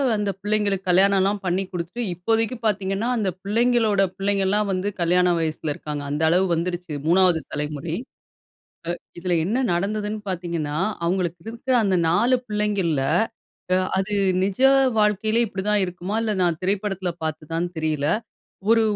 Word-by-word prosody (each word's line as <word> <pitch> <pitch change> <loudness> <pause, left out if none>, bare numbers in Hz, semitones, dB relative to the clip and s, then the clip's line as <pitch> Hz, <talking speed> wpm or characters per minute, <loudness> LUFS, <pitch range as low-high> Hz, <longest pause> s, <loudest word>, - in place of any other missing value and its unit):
அந்த 205 -1 -1
பிள்ளைங்களுக்கு 205 -2 0
கல்யாணம்லாம் 195 +2 +3
பண்ணி 185 +2 +1
குடுத்துட்டு 180 +7 -4
இப்போதைக்கு 225 +7 0
பாத்தீங்கன்னா 200 +1 0
அந்த 200 -4 0
பிள்ளைங்களோட 225 -1 +2 0.2
பிள்ளைங்கலாம் 200 +1 +1
வந்து 185 +2 -1
கல்யாண 180 +1 +3
வயசுல 155 -1 -2
இருக்காங்க. 150 -1 -5
அந்த 150 +2 -2
அளவுக்கு 175 +1 +3
வந்துடுச்சு 175 0 -3 0.2
3வது 180 -1 +4
தலைமுறை. 150 +2 -3 1.0
அ - - -11 0.2
இதுல 180 0 -1
என்ன 245 +7 0
நடந்ததுன்னு 210 +4 -2
பாத்தீங்கன்னா, 170 -4 -3 0.3
அவங்களுக்கு 175 -1 -1
இருக்குற 235 +3 -2
அந்த 190 -2 +2
4 235 +9 +3
பிள்ளைங்கள்ல 205 -9 0 0.9
அது 195 +2 -1 0.3
நிஜ 195 +4 -1 0.4
வாழ்க்கையிலே 215 +2 +2
இப்டி 190 -2 -5
தான் 210 -1 +3
இருக்குமா? 180 +3 -5
இல்ல 220 -1 0
நான் 170 -2 +1
திரைப்படத்துல 195 -1 -1
பாத்ததான்னு 165 +2 -3
தெரியல. 155 -2 -1 0.6
ஒரு 230 0 +5
190 Hz, 130 wpm, -23 LUFS, 170-210 Hz, 1.0 s, ஒரு